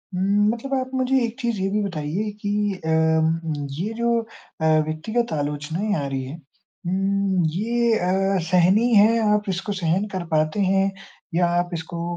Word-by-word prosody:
उम, 200 Hz, +3 st, +2 dB
मतलब 270 Hz, +4 st, -6 dB
आप 260 Hz, 0 st, -5 dB
मुझे 260 Hz, 0 st, +2 dB
एक 235 Hz, +2 st, -7 dB
चीज़ 235 Hz, -5 st, -1 dB
ये 195 Hz, -, 0 dB
भी 210 Hz, +1 st, +1 dB
बताइए 180 Hz, +3 st, -3 dB
कि 205 Hz, 0 st, 0 dB
अम 160 Hz, 0 st, +1 dB, 0.3 s
ये 210 Hz, +5 st, -2 dB
जो 235 Hz, 0 st, +1 dB
अ, 225 Hz, -7 st, -9 dB, 0.2 s
व्यक्तिगत 215 Hz, +7 st, -2 dB
आलोचनाएँ 150 Hz, +7 st, -2 dB
आ -, -, -2 dB
रही 135 Hz, -1 st, -3 dB
हैं 140 Hz, +5 st, -7 dB, 0.5 s
उम, 195 Hz, 0 st, +1 dB
ये 235 Hz, +3 st, +1 dB
अ, 190 Hz, +2 st, +1 dB
सहनीय 190 Hz, +7 st, +4 dB
है, 215 Hz, +3 st, +6 dB, 0.2 s
आप 210 Hz, -1 st, 0 dB
इसको 190 Hz, +2 st, -2 dB
सहन 175 Hz, +5 st, +1 dB
कर 180 Hz, -2 st, -3 dB
पाते 155 Hz, +5 st, +1 dB
हैं 195 Hz, 0 st, +2 dB, 0.4 s
या 175 Hz, 0 st, +3 dB
आप 175 Hz, 0 st, -1 dB
इसको 170 Hz, +1 st, -5 dB
195 Hz, 165 wpm, -23 LUFS, 165-215 Hz, 0.5 s, है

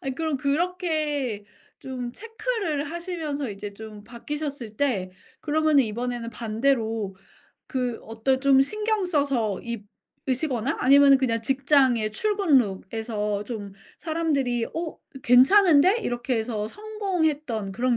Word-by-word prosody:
아니 265 Hz, -1 st, -4 dB
그럼 315 Hz, 0 st, -1 dB
그렇게 300 Hz, -, -1 dB, 0.3 s
좀 250 Hz, -2 st, -6 dB
체크를 440 Hz, -, -3 dB
하시면서 320 Hz, -, -4 dB
이제 200 Hz, 0 st, -7 dB
좀 215 Hz, -1 st, -10 dB
바뀌셨을 255 Hz, 0 st, -6 dB
때 215 Hz, -10 st, 0 dB, 0.3 s
그러면은 310 Hz, -2 st, +3 dB
이번에는 235 Hz, +1 st, -4 dB
반대로 225 Hz, -3 st, -1 dB, 0.5 s
그 250 Hz, -3 st, -2 dB
어떤 225 Hz, +4 st, -1 dB
좀 270 Hz, -1 st, +5 dB
신경 425 Hz, +7 st, 0 dB
써서 275 Hz, -, 0 dB, 0.7 s
입으시거나 260 Hz, -2 st, -1 dB
아니면은 275 Hz, +1 st, +7 dB
그냥 230 Hz, -4 st, 0 dB
직장의 265 Hz, -4 st, +2 dB
출근 400 Hz, -, +3 dB
룩에서 210 Hz, 0 st, -2 dB
좀 205 Hz, -4 st, -6 dB, 0.3 s
사람들이 290 Hz, -8 st, 0 dB
"어 330 Hz, -1 st, -5 dB, 0.2 s
괜찮은데?" 340 Hz, -, +6 dB
이렇게 240 Hz, +1 st, -1 dB
해서 220 Hz, -2 st, -2 dB
성공했던 315 Hz, -, -2 dB
그런 240 Hz, +3 st, +1 dB
265 Hz, 275 characters per minute, -25 LUFS, 225-310 Hz, 0.7 s, 아니면은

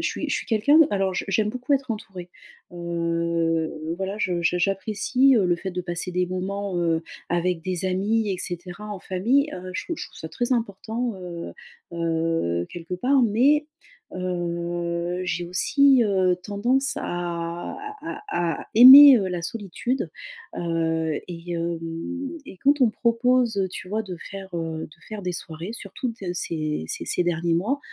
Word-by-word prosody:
suis -, -, -3 dB
je -, -, +1 dB
suis -, -, -5 dB
quelqu'un, 235 Hz, +7 st, +4 dB
alors 195 Hz, -2 st, +1 dB
je -, -, -2 dB
j'aime 210 Hz, +2 st, +1 dB
beaucoup 250 Hz, +4 st, -2 dB
être 270 Hz, -2 st, +1 dB
entourée. 190 Hz, -5 st, -6 dB, 0.4 s
Heu, 170 Hz, -2 st, -1 dB
voilà 195 Hz, +1 st, -3 dB
je 180 Hz, -4 st, 0 dB
j'a 180 Hz, +1 st, +2 dB
j'apprécie, 215 Hz, +8 st, +2 dB
heu, 215 Hz, -5 st, +3 dB
le 175 Hz, -, +2 dB
fait 190 Hz, +2 st, -5 dB
de 180 Hz, -, -2 dB
passer 175 Hz, +1 st, -4 dB
des 180 Hz, 0 st, +1 dB
moments, 190 Hz, +1 st, -3 dB
heu, 165 Hz, -1 st, +1 dB, 0.3 s
avec 175 Hz, 0 st, 0 dB
des 185 Hz, +1 st, -3 dB
amis 205 Hz, +4 st, +1 dB
et 185 Hz, -, -4 dB
cetera, 175 Hz, +4 st, -6 dB
en 205 Hz, -3 st, -6 dB
famille. 245 Hz, +13 st, +1 dB
Heu, 185 Hz, 0 st, -7 dB
je -, -, -3 dB
je -, -, -5 dB
trouve -, -, -18 dB
ça 160 Hz, -, -6 dB
très 240 Hz, +8 st, -1 dB
important, 230 Hz, +1 st, -2 dB
heu 175 Hz, -2 st, -7 dB, 0.4 s
heu, 165 Hz, -, 0 dB
quelque 175 Hz, +1 st, -6 dB
part. 260 Hz, +9 st, +2 dB
Mais 265 Hz, +7 st, +3 dB, 0.5 s
heu, 175 Hz, -1 st, -2 dB
j'ai 175 Hz, -1 st, -2 dB
aussi, 270 Hz, +8 st, +4 dB
heu, 190 Hz, -3 st, +2 dB
tendance 245 Hz, +8 st, 0 dB
à 170 Hz, -1 st, -4 dB, 0.3 s
à -, -, -6 dB
à 170 Hz, -2 st, -1 dB
aimer, 265 Hz, +4 st, +11 dB
heu, 195 Hz, -3 st, -1 dB
la 175 Hz, -2 st, -3 dB
solitude. 210 Hz, +3 st, -3 dB, 0.5 s
Heu, 165 Hz, -2 st, -1 dB
et 175 Hz, 0 st, -6 dB
hem, 170 Hz, 0 st, -2 dB, 0.7 s
et -, -, -10 dB
quand 285 Hz, +5 st, +3 dB
on 255 Hz, -, +7 dB
me -, -, +1 dB
propose, 235 Hz, -1 st, +2 dB
heu, 190 Hz, -1 st, +1 dB
tu 185 Hz, 0 st, -8 dB
vois, 215 Hz, +2 st, -1 dB
de 185 Hz, -4 st, -7 dB
faire, 195 Hz, -1 st, -7 dB
heu, 165 Hz, -1 st, -3 dB
de -, -, -19 dB
faire 215 Hz, -2 st, -6 dB
des 180 Hz, -1 st, -2 dB
soirées, 165 Hz, +3 st, -6 dB
surtout 230 Hz, +2 st, -5 dB
dans 200 Hz, -6 st, -5 dB
ces 155 Hz, -, -2 dB
ces -, -, -4 dB
ces -, -, +1 dB
derniers 170 Hz, -1 st, 0 dB
mois, 215 Hz, +12 st, 0 dB
185 Hz, 170 wpm, -24 LUFS, 170-220 Hz, 0.7 s, aimer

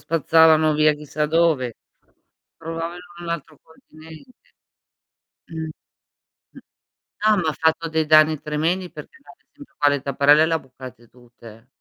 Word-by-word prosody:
spazzavano 160 Hz, -1 st, +3 dB
via 155 Hz, 0 st, +3 dB
chissà 150 Hz, 0 st, -4 dB
dove. 155 Hz, -7 st, +1 dB, 0.8 s
Provavano 165 Hz, +1 st, -6 dB
in 175 Hz, -1 st, -13 dB
un 170 Hz, -, -7 dB
altro 155 Hz, -2 st, -6 dB
continente. 160 Hz, -, -18 dB, 0.9 s
Mh. 160 Hz, -1 st, -6 dB, 0.8 s
Mh. -, -, -15 dB, 0.6 s
Ah, 215 Hz, 0 st, +3 dB
m'ha 160 Hz, -4 st, -1 dB
fatto 160 Hz, +1 st, 0 dB
dei 160 Hz, 0 st, -1 dB
danni 155 Hz, 0 st, +4 dB
tremendi 165 Hz, +5 st, -2 dB
perché 155 Hz, -, -12 dB
ad 345 Hz, -, -18 dB
esempio 285 Hz, 0 st, -19 dB
qua 145 Hz, -, +3 dB
le 145 Hz, -2 st, -1 dB
tapparelle 140 Hz, +3 st, +3 dB
le 165 Hz, -, -2 dB
ha 160 Hz, -, 0 dB
bucate 130 Hz, -3 st, -14 dB
tutte, 120 Hz, -1 st, -17 dB
eh. 115 Hz, +3 st, -21 dB
155 Hz, 140 wpm, -21 LUFS, 145-165 Hz, 0.9 s, danni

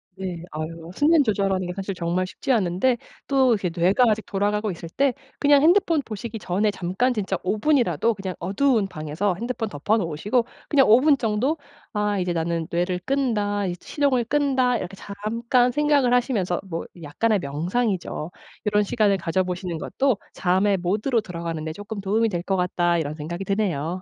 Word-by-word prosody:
네. 185 Hz, -3 st, -5 dB
아유. 165 Hz, +2 st, -6 dB
수면 305 Hz, 0 st, +4 dB
조절하는 195 Hz, -4 st, 0 dB
게 180 Hz, -, -4 dB
사실 195 Hz, 0 st, -4 dB
정말 175 Hz, +1 st, -1 dB
쉽지 225 Hz, +8 st, -4 dB
않은데 215 Hz, +3 st, +2 dB, 0.3 s
또 265 Hz, -3 st, +4 dB
이렇게 195 Hz, -4 st, -1 dB
뇌가 185 Hz, +8 st, +4 dB
아직 215 Hz, 0 st, 0 dB
돌아가고 205 Hz, +1 st, 0 dB
있을 165 Hz, -1 st, -8 dB
때 275 Hz, +6 st, +1 dB, 0.3 s
그냥 285 Hz, -1 st, +5 dB
핸드폰 335 Hz, -1 st, +4 dB
보시기 220 Hz, +1 st, -6 dB
전에 205 Hz, +3 st, 0 dB
잠깐 200 Hz, +8 st, 0 dB
진짜 195 Hz, -4 st, -2 dB
5 205 Hz, +3 st, -1 dB
분이라도 240 Hz, -5 st, +2 dB
그냥 190 Hz, -1 st, -5 dB
어두운 210 Hz, +3 st, +1 dB
방에서 160 Hz, +4 st, -2 dB
핸드폰 235 Hz, +1 st, -3 dB
덮어 205 Hz, +7 st, 0 dB
놓으시고 205 Hz, +7 st, 0 dB, 0.2 s
그냥 275 Hz, -3 st, +5 dB
5 220 Hz, -, +8 dB
분 295 Hz, -1 st, +5 dB
정도 240 Hz, +8 st, 0 dB, 0.4 s
'아 210 Hz, -1 st, 0 dB
이제 180 Hz, -1 st, -1 dB
나는 165 Hz, 0 st, -1 dB
뇌를 180 Hz, +1 st, 0 dB
끈다. 210 Hz, -7 st, 0 dB
이제 175 Hz, -, -3 dB
시동을 275 Hz, -5 st, +1 dB
끈다.' 260 Hz, -2 st, +2 dB
이렇게 190 Hz, -2 st, -6 dB
잠깐 230 Hz, +5 st, 0 dB
생각을 290 Hz, -3 st, +2 dB
하시면서 215 Hz, -8 st, 0 dB
뭐 165 Hz, -2 st, -4 dB, 0.2 s
약간의 210 Hz, +9 st, +1 dB
명상이죠. 175 Hz, -, -2 dB, 0.3 s
'요런 210 Hz, 0 st, +3 dB
시간을 205 Hz, -1 st, +2 dB
가져 185 Hz, +1 st, 0 dB
보시는 180 Hz, -1 st, -4 dB
것도 255 Hz, -, 0 dB, 0.2 s
잠의 190 Hz, +2 st, +2 dB
모드로 215 Hz, +7 st, 0 dB
들어가는데 165 Hz, -3 st, -5 dB
쪼끔 205 Hz, +2 st, -7 dB
도움이 220 Hz, +3 st, +1 dB
될 175 Hz, -3 st, -2 dB
거 195 Hz, -, +2 dB
같다.' 175 Hz, -1 st, +1 dB
이런 150 Hz, -3 st, -2 dB
생각이 170 Hz, +5 st, -5 dB
드네요. 185 Hz, -4 st, -1 dB
200 Hz, 370 characters per minute, -24 LUFS, 180-240 Hz, 0.4 s, 5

